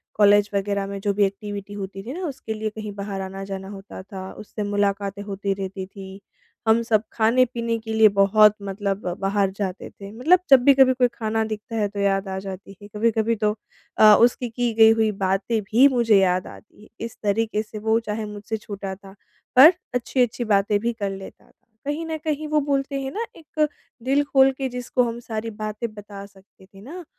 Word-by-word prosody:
College 205 0 +5
वग़ैरह 200 0 -1
में 200 0 -5
जो 200 -1 0
भी 205 0 +3
एक्टिविटी 205 0 -6
होती 195 -1 -7
थी 250 +5 -6
ना 365 +2 -5
उसके 260 -5 -6
लिए 215 0 -3
कहीं 215 -1 -7
बाहर 200 -1 -5
आना 195 +1 -6
जाना 190 0 -5
होता 195 -1 -9
था 190 -1 -8
उससे 210 0 -6
मुलाकातें 200 0 -1
होती 200 -1 -3
रहती 190 -1 -5
थी। 195 0 -11 0.5
हम 225 +1 +4
सब 215 -2 +2
खाने-पीने 235 0 +1
के 220 0 -6
लिए 220 -1 +6
बहुत 210 +1 +5
मतलब 200 0 -3
बाहर 195 0 +1
जाते 195 -2 -4
थे 200 0 -11
मतलब 315 +11 +3
जब 260 -2 +7
भी 280 0 +7
कभी 265 -1 +5
कोई 250 -1 +3
खाना 220 0 -1
दिखता 215 +2 -6
है 210 -2 +1
तो 200 0 -7
याद 195 0 +1
आ 190 0 -4
जाती 195 0 -8
थी। 205 +2 -14
कभी-कभी 220 +2 0
तो 210 0 +2 0.4
अ, 215 -1 +8
उसकी 240 0 +2
की 240 +1 -1
गई 220 0 +7
हुई 220 -1 +3
बातें 200 +4 0
भी 230 +8 +5
मुझे 225 -4 +4
याद 180 -1 +1
आती 210 0 -15
है। - - -18 0.2
इस 230 - -9
तरीके 215 +1 0
से 215 0 -9
वो 225 +1 +4
चाहे 215 -1 -4
मुझसे 210 +2 -5
छोटा 200 -2 -6
था 195 0 -15 0.4
पर 305 +8 +9 0.2
अच्छी-अच्छी 245 -1 0
बातें 205 -1 +2
भी 235 +2 -1
कर 200 -3 -3
लेता 195 0 -10
था। - - -43 0.2
कहीं 300 +3 -3
न 320 -1 -3
कहीं 310 -1 -2
वो 300 0 +2
बोलते 275 0 -1
हैं 270 0 -4
ना 455 - -3
एक 310 -1 -1 0.4
दिल 275 +3 +2
खोल 270 -1 +4
के 270 -1 -2
जिसको 250 0 -1
हम 235 0 -3
सारी 225 -1 -5
बातें 215 +1 -4
बता 205 -1 -10
सकते 195 -1 -20
थे 195 0 -17
ना 335 - -9
210 Hz, 205 wpm, -23 LUFS, 200-235 Hz, 0.5 s, पर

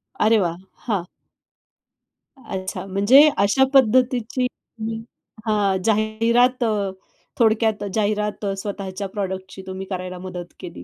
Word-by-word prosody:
अरे 220 +1 +4
वाह! 170 -3 -1 0.3
हां. 195 -6 -1 1.4
अच्छा. 185 0 -5
म्हणजे 205 +10 +6
अशा 200 +7 +4
पद्धतीची 255 -1 +3 0.4
हं, 225 0 -3 0.5
हां. 205 -3 +2
जाहिरात 230 +3 +2
अ, 210 -4 0 0.5
थोडक्यात 220 -2 +2
जाहिरात 210 0 -1
स्वतःच्या 195 0 -5
प्रॉडक्टची 190 -1 -5
तुम्ही 190 0 -5
करायला 185 -1 -4
मदत 180 -1 -7
केली. 170 - -9
210 Hz, 105 wpm, -22 LUFS, 190-225 Hz, 1.4 s, म्हणजे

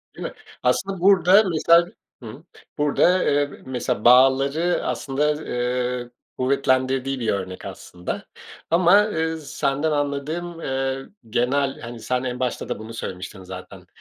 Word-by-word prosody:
Değil - - -8
mi? - - -10 0.3
Aslında, 190 +9 0
burada, 195 +1 +6
mesela, 170 +1 +4 0.3
hımm, 125 +8 -10 0.3
burada, 155 +5 +3
eee, 145 0 +1
mesela, 125 -4 -3
bağları 135 +7 +4
aslında, 150 +2 -1
eee, 125 0 -2 0.3
kuvvetlendirdiği 130 0 +1
bir 115 - -1
örnek 95 -2 -3
aslında 90 0 -7 0.4
ama, 185 +5 +5
eee, 160 -2 -1
senden 145 0 -1
anladığım, 150 +4 -3
eee, 135 0 -2 0.2
genel, 135 +4 0
hani, 120 -1 -8
sen 125 +2 -2
en 125 -1 -3
başta 125 -2 -2
da - - -3
bunu 110 +1 -9
söylemiştin 95 -2 -7
zaten. 90 0 -10
135 Hz, 130 wpm, -23 LUFS, 125-160 Hz, 0.4 s, burada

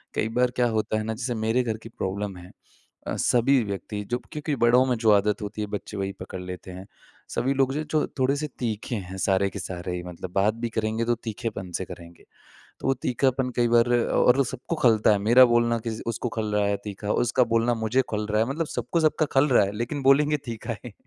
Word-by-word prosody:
कई 110 - 0
बार 125 0 +3
क्या 125 - +3
होता 110 -1 0
है 110 - -2
ना, 110 - -2
जैसे 120 +2 -3
मेरे 110 +3 +1
घर 110 -2 -2
की 115 +1 -12
प्रॉब्लम 100 -1 -4
है। 90 +1 -12 0.6
अ, - - -2
सभी 125 +2 +3
व्यक्ति 105 0 -5
जो 120 - +1
क्योंकि 150 -1 -2
बड़ों 120 +2 +5
में 125 -1 +1
जो 110 -1 +3
आदत 105 +2 +2
होती 105 +1 -5
है 105 - -2
बच्चे 105 - -9
वही 95 0 -2
पकड़ 95 - -6
लेते 90 +1 -8
हैं 95 +1 -9 0.4
सभी 135 +2 0
लोग 135 -1 +2
जो 150 - -2
हैं, 155 - -3
जो 155 - +1
थोड़े-से 140 +3 +1
तीखे 115 0 -3
हैं 95 -2 -6
सारे 100 0 +2
के - - -6
सारे 90 -1 -5
ही 90 - -5
मतलब 90 0 -8
बात 100 +2 +3
भी 120 - 0
करेंगे 110 0 -1
तो 120 0 +2
तीखेपन 110 -4 -5
से 95 - -4
करेंगे। 85 -1 -12 0.6
तो - - -4
वो 135 - +3
तीखापन 130 +1 +1
कई 120 -1 +3
बार 120 0 +4
और 120 +1 +3
वो 140 - +3
सबको 130 +6 -4
खलता 110 -3 +5
है। 105 - +2
मेरा 120 +6 +7
बोलना 120 0 +2
किसी 110 -1 -3
उसको 115 +1 -2
खल 110 -1 -1
रहा 105 0 +2
है 100 0 +1
तीखा, 105 0 -5
उसका 120 +2 +2
बोलना 115 +1 +3
मुझे 115 +3 +1
खल 105 -1 -2
रहा 105 +1 +3
है, 115 - -1
मतलब 160 +4 -2
सबको 125 +6 -2
सबका 155 0 +2
खल 135 +2 +4
रहा 120 -5 +5
है, 100 - -3
लेकिन 120 +6 -3
बोलेंगे 145 +3 +4
तीखा 115 -1 -5
ही। 120 - -8
115 Hz, 235 wpm, -25 LUFS, 105-125 Hz, 0.6 s, मेरा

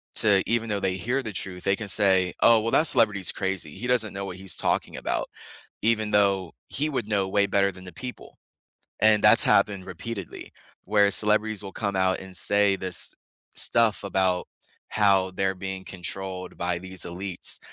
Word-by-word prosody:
to 100 -3 +4
even 115 0 0
though 105 -1 -1
they 95 -1 0
hear 125 +8 -1
the 110 -3 -5
truth, 90 -1 -4
they 100 0 +3
can 105 +1 -5
say, 95 -3 +3
"Oh, 115 -1 +6
well, 115 +1 -2
that 160 - +3
celebrity 105 -8 +3
is - - 0
crazy. 95 -6 -2
He 125 - -7
doesn't 115 -5 +1
know 100 - -4
what 90 -2 -7
he's 95 -2 -3
talking - - 0
about," - - -2 0.6
even 110 -1 +1
though 95 -4 +2 0.2
he 150 +3 -1
would 125 -7 -2
know 100 -3 0
way 100 +1 +2
better 100 0 +2
than 95 +1 -13
the 90 - -9
people. 125 +8 -9 0.6
And 110 -1 +5
that's - - +7
happened 95 -2 +2
repeatedly, 95 +1 -7 0.3
where 100 -1 +3
celebrities 105 0 0
will 95 - -7
come 100 -3 -3
out 95 0 +1
and 95 -1 -8
say 100 -1 +3
this 95 -2 -3 0.4
stuff 115 -3 +2
about 95 -2 +1 0.4
how 95 -3 +3
they're 95 +1 0
being 95 0 -5
controlled 95 0 -5
by 90 0 -1
these 95 0 -5
elites, 90 +1 -5
100 Hz, 185 wpm, -25 LUFS, 95-105 Hz, 0.6 s, that's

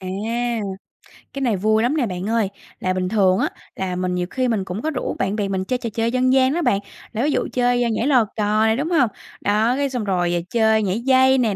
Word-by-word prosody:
À, 185 - -6 1.3
cái 275 - -5
này 235 -6 +1
vui 215 +3 +2
lắm 265 +6 +1
nè 270 - +2
bạn 185 0 -4
ơi. 225 -3 +1 0.3
Là 185 - 0
bình 185 0 -1
thường 190 -3 +3
á, - - +1 0.3
là 185 -1 -3
mình 180 0 -1
nhiều 180 0 -1
khi 255 +3 -1
mình 220 -5 0
cũng 190 +3 -5
có 315 - -1
rủ 280 -5 -3
bạn 195 +1 0
bè 205 -2 -1
mình 190 -1 -2
chơi 255 - -1
trò 240 -2 -4
chơi 230 +1 0
dân 255 +1 +2
gian 265 0 +4
đó 345 - 0
bạn. 200 -11 +2 0.3
Là 225 +2 -1
ví 295 - +2
dụ - - 0
chơi 245 -1 +2
nhảy 225 +4 0
lò 255 -6 +4
cò 215 0 +2
này, 220 0 +2
đúng 295 +5 -2
hông? 290 -9 +3 0.3
Đó, 215 +4 +2
cái 280 0 0
xong 250 -4 -3
rồi 175 -3 0
chơi 220 -2 +3
nhảy 195 +2 -1
dây 260 +1 +4
nè, 225 -6 +1
220 Hz, 250 wpm, -21 LUFS, 195-255 Hz, 1.3 s, gian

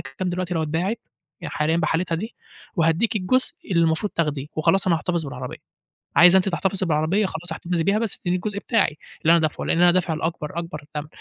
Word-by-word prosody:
كام 135 +8 -5
دلوقتي 180 0 -2
لو 160 - 0
اتباعت 170 +9 -1 0.4
يعني - - -6
حاليًا 150 +3 +1
بحالتها 165 +1 0
دي، 215 +8 -5 0.4
وهادّيكِ 170 +7 +2
الجزء 235 +7 +1 0.2
اللي 170 -3 +3
المفروض 165 +5 0
تاخديه، 150 -4 -1
وخلاص 190 +5 +2
أنا 170 - +4
هاحتفظ 170 0 -2
بالعربية، 125 -1 -6 0.6
عايزة 180 +2 +8
أنتِ 190 +1 +3
تحتفظي 190 +1 0
بالعربية 160 +7 +1
خلاص 175 -1 -6
احتفظي 170 0 -2
بيها، 200 +3 +2
بس 225 -3 0
ادّيني 180 +1 0
الجزء 200 +2 -3
بتاعي 215 -11 +1 0.3
اللي 165 - +5
أنا 170 - +5
دافعُه 155 -2 -1
لأن - - +1
أنا 175 0 +6
دافع 175 -2 +1
الأكبر 160 0 -3
أكبر 160 -3 -6
تَمَن، 150 0 -3
170 Hz, 200 wpm, -23 LUFS, 160-185 Hz, 0.6 s, عايزة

